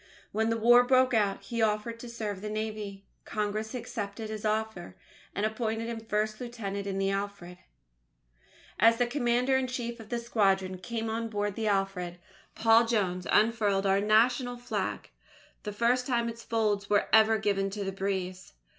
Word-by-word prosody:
When 220 +1 +1
the 230 - +1
War 240 +2 +6
broke 255 0 +4
out, 205 -3 +1
he 235 -2 -3
offered 220 +2 0
to 240 - -8
serve 215 -4 -4
in - - -12
the 210 - -4
Navy. 215 -2 -4 0.2
Congress 215 +2 -3
accepted 220 -2 -5
his 215 0 -5
offer, 215 -4 -2 0.4
and 205 - 0
appointed 225 +1 -2
him 230 -1 -4
first 215 0 -2
lieutenant 200 -5 -5
in 195 -1 -2
the 195 0 +1
Alfred. 195 -3 -4 1.2
As 230 0 +6
the 245 - +2
commander 245 0 +1
in 260 -1 0
chief 240 -2 -4
of 220 -1 -11
the 240 - -1
squadron 195 -5 +1
came 225 +5 -4
on 225 +1 -2
board 205 -1 -1
the 220 +1 -2
Alfred, 195 -3 -1 0.4
Paul 225 +1 +5
Jones 185 -6 0
unfurled 210 -3 +3
our 195 0 +3
National 245 +4 +3
Flag 225 -5 -4 0.5
the 210 - -5
first 240 +4 +1
time 235 -3 +1
its 230 0 -8
folds 210 -3 0
were 205 -1 +3
ever 220 0 +6
given 195 -2 0
to 200 +1 -4
the 195 - -2
breeze. 190 -1 -4
215 Hz, 170 wpm, -29 LUFS, 200-230 Hz, 1.2 s, War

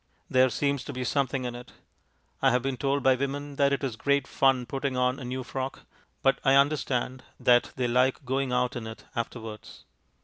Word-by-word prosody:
There 130 0 +5
seems 140 +1 0
to - - -6
be 130 0 -3
something 130 0 0
in 120 - -3
it. 120 +1 -10 0.7
I 135 - +5
have 125 -1 +1
been 135 -1 -1
told 140 +2 0
by 130 - +6
women 140 +2 -3
that 140 0 +3
it 140 0 -1
is 130 -5 -2
great 140 +3 +1
fun 135 -2 +2
putting 135 0 -3
on 125 +1 +1
a - - -7
new 130 +1 -4
frock, 130 - -5 0.4
but 135 - +3
I 135 - +5
understand 135 -3 +1 0.2
that 120 -1 +4
they 125 -1 0
like 125 +3 +2
going 130 0 -1
out 125 +1 +1
in 115 -2 -5
it 110 - -10
afterwards. 115 -2 -6
130 Hz, 200 wpm, -27 LUFS, 125-135 Hz, 0.7 s, by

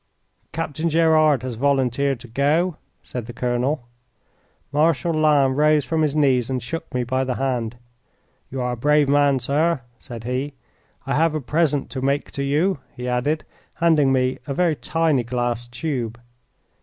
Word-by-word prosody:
"Captain 165 +1 -2
Gerard 155 -4 +4
has 130 -1 -3
volunteered 135 +1 +1
to - - -10
go," 150 +8 +1 0.3
said 120 -3 -6
the 120 - -7
colonel. 125 +3 -1 0.8
Marshal 160 +1 +2
Lannes 150 -4 +3
rose 150 0 +3
from 160 -1 0
his 150 -2 +1
knees 130 -5 +2
and 130 -2 -2
shook 165 +7 -5
me 125 -1 -1
by 130 +2 0
the 130 -1 -2
hand. 125 -4 -2 0.7
"You 130 0 -4
are 125 0 -1
a - - -2
brave 150 +4 +3
man, 140 -1 +3
sir," 145 +4 +1 0.2
said 120 -5 -9
he. 130 +4 -3 0.5
"I - - -1
have 160 0 +2
a - - 0
present 150 0 0
to 130 - -4
make 140 +2 0
to 140 - -4
you," 150 +6 +1 0.2
he 125 0 -5
added, 125 +6 0 0.3
handing 155 -5 +3
me 130 0 +1
a 140 - -3
very 170 -2 +2
tiny 155 -4 +1
glass 120 0 -2
tube. 120 -2 -4
140 Hz, 165 wpm, -22 LUFS, 125-155 Hz, 0.8 s, Gerard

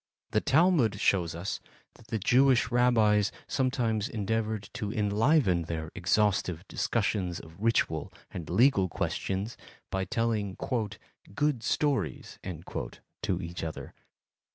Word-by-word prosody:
The - - +2
Talmud 145 - +3
shows 85 -6 +2
us 85 +4 -3 0.3
that 110 - -19
the 115 - -1
Jewish 125 +5 +4
Rabbis 110 -4 +4
sometimes 125 -4 0
endeavored 110 -1 -2
to 105 -1 -3
enliven 105 - +2
their 80 -1 -4
exhaustive 90 -2 +1
discussions 100 -6 -1
of 80 - -12
ritual 105 -9 +1 0.2
and 80 -4 -6
legal 115 -7 +4
questions 100 +6 -2 0.3
by 95 0 -1
telling 110 -4 -1 0.8
"good 145 -5 +1
stories" 135 - -1
to 90 +1 -5
each 85 +1 -5
other. 80 -1 -6
105 Hz, 110 wpm, -29 LUFS, 90-115 Hz, 0.8 s, Jewish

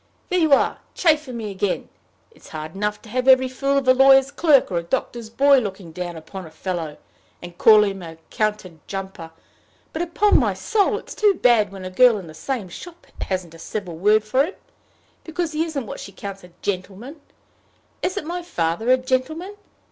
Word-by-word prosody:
"There 365 - +1
you 320 -3 +2
are, 275 - +3 0.2
chaffing 300 -7 +1
me 215 -3 -5
again! 195 0 -2 0.4
It's - - -18
hard 155 0 -7
enough 210 +1 -3
to 220 - -13
have 255 +3 -2
every 260 0 +6
fool 275 +2 -1
of 275 -2 -1
a 255 - +7
lawyer's 270 +1 +6
clerk, 290 - +3
or 175 - +1
a - - -4
doctor's 235 +4 -3
boy, 275 +4 +5
looking 190 -6 -6
down 175 0 -6
upon 165 +3 -9
a - - -12
fellow, 160 -2 -5 0.4
and 175 0 -10
calling 210 -2 +6
him 195 -1 -9
a 165 -2 -9
counter 215 -3 -1 0.2
jumper; 190 -4 -6 0.6
but, 320 - -3
upon 350 +5 +3
my - - 0
soul, 420 -1 +1
it's - - -9
too 415 -2 +3
bad 230 - +3
when 190 -1 -9
a 185 - -6
girl 240 +3 +5
in 190 - -8
the 160 - -11
same 235 - -4
shop 345 - -11 0.2
hasn't 185 -3 -3
a 165 - -13
civil 180 -2 -5
word 210 +5 +3
for 255 +6 +2
him, 350 +6 -5 0.7
because 335 0 -3
he 310 +1 0
isn't 290 -6 -4
what - - -7
she 195 - -9
counts 195 0 -8
a 180 - -13
gentleman! 205 - -5 0.8
Isn't 360 -4 -2
my 350 +2 -4
father 175 - -2
a 255 - +6
gentleman? 280 +10 -2
220 Hz, 195 wpm, -22 LUFS, 185-280 Hz, 0.8 s, a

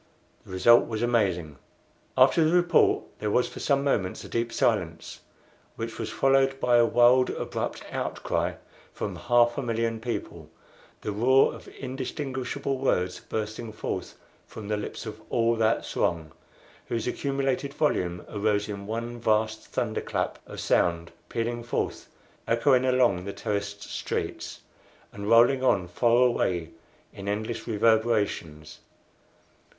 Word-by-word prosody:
The - - -11
result 120 +6 +5
was 110 0 -3
amazing. 90 - 0 0.6
After 165 - +6
the 160 +3 +3
report 175 0 +4 0.2
there 105 - -1
was 125 +4 +2
for - - -9
some 140 -1 +1
moments 100 -10 -1
a - - -9
deep 115 0 -1
silence, 90 -8 -1 0.6
which 115 0 -6
was 115 - -3
followed 135 0 +2
by 120 -1 +4
a 120 -1 +5
wild, 125 +2 +5
abrupt - - -4
outcry - - -2 0.4
from - - -4
half 120 +1 +3
a - - 0
million 115 -2 -1
people 120 +1 -5 0.5
the 105 - -3
roar 125 +6 +4
of - - -12
indistinguishable 135 0 -4
words 90 -9 0
bursting 110 +1 -5
forth 105 - -5 0.3
from 105 -2 -9
the 105 - 0
lips 105 - -6
of - - -7
all 115 0 +2
that 110 0 +1
throng, 80 -3 -1 0.6
whose 115 -2 -2
accumulated 135 +1 -1
volume 90 - -1
arose 105 0 0
in 100 -1 -6
one 115 +2 -4
vast 110 -1 0
thunder - - -2
clap - - -3
of - - -8
sound, 85 -1 +1 0.2
pealing 120 +1 -2
forth, 120 - -3 0.4
echoing 125 +2 +3
along 125 -8 +3
the 100 +1 -5
terraced 100 0 -3
streets, - - -4 0.5
and 100 +1 -5
rolling 120 +3 +5
on 95 -8 +2
far 120 +7 +3
away 90 -9 0 0.4
in 100 0 -8
endless 110 +4 -3
reverberations. 105 -9 0
115 Hz, 135 wpm, -27 LUFS, 100-125 Hz, 0.6 s, After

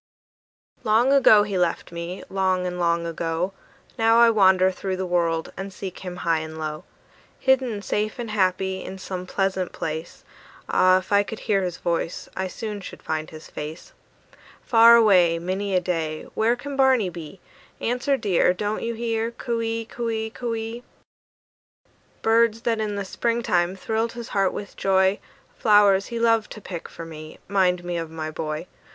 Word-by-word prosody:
Long 230 +5 +3
ago 220 -7 +7
he 200 -3 -2
left 175 -1 -1
me, 170 +2 -6
long 185 -1 0
and 180 0 -3
long 170 -1 +1
ago: 165 +2 -2 0.5
Now 225 0 +5
I 235 0 +7
wander 190 -3 +5
through 190 0 -4
the 190 - -2
world 170 -2 0
and 195 +1 -6
seek 190 -1 -7
him 180 -1 -6
high 165 -1 +2
and 160 0 -7
low; 155 -1 -5 0.5
Hidden 255 -6 +1
safe 210 +2 -1
and 235 -3 -5
happy, 190 -1 0
in 190 - -7
some 185 -1 -6
pleasant 190 -1 -1
place, 160 +1 -5 0.4
Ah, 185 0 +4
if 185 +1 -6
I 200 0 +5
could 215 +2 -7
hear 200 -2 +1
his 180 -2 -3
voice, 170 0 -2
I 190 0 -2
soon 210 +2 -6
should - - -10
find 155 0 -3
his 155 0 -11
face. 155 - -7 0.7
Far 230 -1 +7
away, 185 -7 +5
Many 190 +3 -2
a - - +5
day, 165 -3 -2
Where 225 +2 +2
can 280 +3 -7
Barney 260 -8 +3
be? 170 +2 -9 0.4
Answer, 250 +4 0
dear, 185 -5 +2
Don't 210 +3 -2
you 235 0 -3
hear? 225 0 -1
"Coo 235 0 -3
ee, 225 0 -2
coo 235 +1 -4
ee, 220 0 -2
coo 235 -1 -3
ee!" 225 +2 -5 1.4
Birds 225 0 +3
that 230 -2 0
in 210 -1 -2
the 200 -1 -3
spring 235 +4 -1
time 175 -2 +1
thrilled 225 +4 -2
his 235 -1 -7
heart 195 -2 +1
with 200 - -7
joy, 190 0 +2 0.4
Flowers 205 -3 +4
he 235 - -5
loved 230 -2 +2
to - - -10
pick 180 -4 -7
for 165 - -9
me, 155 -1 -10
'mind 185 -2 +2
me 175 0 -3
of 165 -1 -4
my 160 -1 -5
boy. 155 +1 -4
195 Hz, 175 wpm, -24 LUFS, 175-225 Hz, 1.4 s, ago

